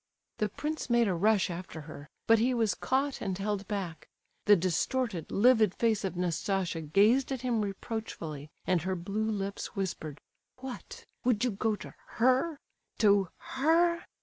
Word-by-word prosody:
The 210 Hz, -, +1 dB
prince 300 Hz, +6 st, -4 dB
made 235 Hz, -1 st, +4 dB
a 190 Hz, -, +1 dB
rush 200 Hz, +2 st, +2 dB
after 170 Hz, -2 st, -7 dB
her, 150 Hz, -1 st, -10 dB, 0.2 s
but 225 Hz, 0 st, +5 dB
he 250 Hz, +3 st, +2 dB
was 225 Hz, -3 st, +2 dB
caught 270 Hz, +2 st, -1 dB
and 190 Hz, -3 st, -2 dB
held 200 Hz, 0 st, -2 dB
back. 190 Hz, -6 st, -4 dB, 0.4 s
The 205 Hz, -, +8 dB
distorted, 185 Hz, +2 st, -1 dB
livid 220 Hz, -3 st, +4 dB
face 225 Hz, -3 st, +1 dB
of 190 Hz, -2 st, -2 dB
Nastasia 180 Hz, 0 st, -1 dB
gazed 210 Hz, -, +3 dB
at 265 Hz, -3 st, -2 dB
him 240 Hz, -3 st, 0 dB
reproachfully, 195 Hz, -, -5 dB, 0.2 s
and 180 Hz, -2 st, +2 dB
her 185 Hz, +3 st, -1 dB
blue 205 Hz, +5 st, -2 dB
lips 200 Hz, -2 st, -4 dB
whispered: 160 Hz, -6 st, -4 dB, 0.4 s
"What? 255 Hz, -1 st, -8 dB, 0.2 s
Would 245 Hz, -3 st, +2 dB
you 250 Hz, -, +2 dB
go 215 Hz, +2 st, 0 dB
to -, -, -10 dB, 0.2 s
her—to 240 Hz, -, +1 dB
her?" 335 Hz, +5 st, +2 dB
210 Hz, 150 wpm, -30 LUFS, 185-245 Hz, 0.4 s, The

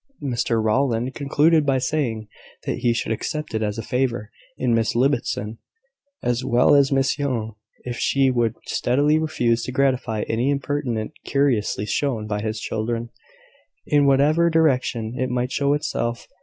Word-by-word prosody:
Mr 120 Hz, -3 st, 0 dB
Rowland 120 Hz, +2 st, +1 dB
concluded 150 Hz, +2 st, +3 dB
by 135 Hz, -2 st, +2 dB
saying, 125 Hz, -5 st, -1 dB, 0.4 s
that -, -, -2 dB
he 120 Hz, -1 st, +2 dB
should 115 Hz, -1 st, -2 dB
accept 150 Hz, +6 st, -3 dB
it 110 Hz, -, -1 dB
as 105 Hz, 0 st, -2 dB
a 115 Hz, -, -4 dB
favour 120 Hz, -3 st, -1 dB, 0.3 s
in 125 Hz, -2 st, +1 dB
Miss 115 Hz, -1 st, +1 dB
Ibbotson, 120 Hz, -4 st, 0 dB, 0.6 s
as 120 Hz, +1 st, 0 dB
well 125 Hz, 0 st, +4 dB
as 140 Hz, -1 st, +4 dB
Miss 135 Hz, +1 st, +1 dB
Young, 120 Hz, -6 st, -2 dB, 0.3 s
if 120 Hz, -1 st, -5 dB
she 135 Hz, -1 st, +2 dB
would 120 Hz, -3 st, 0 dB
steadily 145 Hz, +5 st, +2 dB
refuse 120 Hz, -7 st, 0 dB
to -, -, -4 dB
gratify 130 Hz, -5 st, 0 dB
any 120 Hz, +4 st, 0 dB
impertinent 140 Hz, -5 st, -2 dB
curiosity 125 Hz, -8 st, 0 dB
shown 115 Hz, 0 st, -1 dB
by 105 Hz, -1 st, -3 dB
his 110 Hz, 0 st, -3 dB
children, 115 Hz, +2 st, -3 dB, 0.7 s
in 145 Hz, -1 st, +3 dB
whatever 150 Hz, +5 st, +4 dB
direction 130 Hz, -8 st, +1 dB
it 130 Hz, 0 st, 0 dB
might 125 Hz, +1 st, -1 dB
show 140 Hz, 0 st, +1 dB
itself. 120 Hz, -5 st, -3 dB
125 Hz, 155 wpm, -22 LUFS, 115-140 Hz, 0.7 s, well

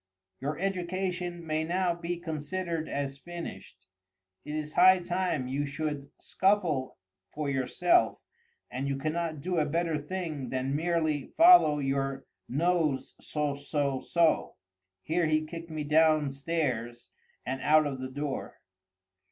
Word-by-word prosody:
] 95 Hz, 0 st, -56 dB
"Your 145 Hz, +2 st, -2 dB
education 180 Hz, -2 st, -2 dB
may 155 Hz, 0 st, 0 dB
now 175 Hz, +2 st, +1 dB
be 170 Hz, +1 st, -4 dB
considered 165 Hz, 0 st, -3 dB
as 140 Hz, -1 st, -3 dB
finished—it 95 Hz, -, -11 dB
is 155 Hz, 0 st, -4 dB
high 185 Hz, +1 st, +7 dB
time 180 Hz, -6 st, -1 dB
you 140 Hz, +3 st, -1 dB
should 145 Hz, -1 st, -4 dB
scuffle 180 Hz, -9 st, +1 dB, 0.4 s
for 150 Hz, -2 st, -1 dB
yourself—and 350 Hz, -, -1 dB
you 140 Hz, -1 st, -1 dB
cannot 155 Hz, +1 st, -2 dB
do 180 Hz, +2 st, 0 dB
a 150 Hz, -, +2 dB
better 165 Hz, 0 st, 0 dB
thing 155 Hz, -5 st, -4 dB
than 130 Hz, +1 st, -1 dB
merely 160 Hz, -3 st, 0 dB
follow 330 Hz, -, +8 dB
your 135 Hz, -1 st, -1 dB, 0.2 s
nose—so—so—so—" 145 Hz, -1 st, 0 dB, 0.5 s
[Here 165 Hz, +1 st, +1 dB
he 155 Hz, 0 st, +1 dB
kicked 165 Hz, +1 st, -8 dB
me 155 Hz, -1 st, -3 dB
downstairs 145 Hz, -5 st, +1 dB, 0.3 s
and 130 Hz, +1 st, -3 dB
out 155 Hz, 0 st, +5 dB
of 135 Hz, -3 st, -3 dB
the 130 Hz, -, -4 dB
door. 145 Hz, +1 st, -5 dB
155 Hz, 120 wpm, -29 LUFS, 140-170 Hz, 0.5 s, follow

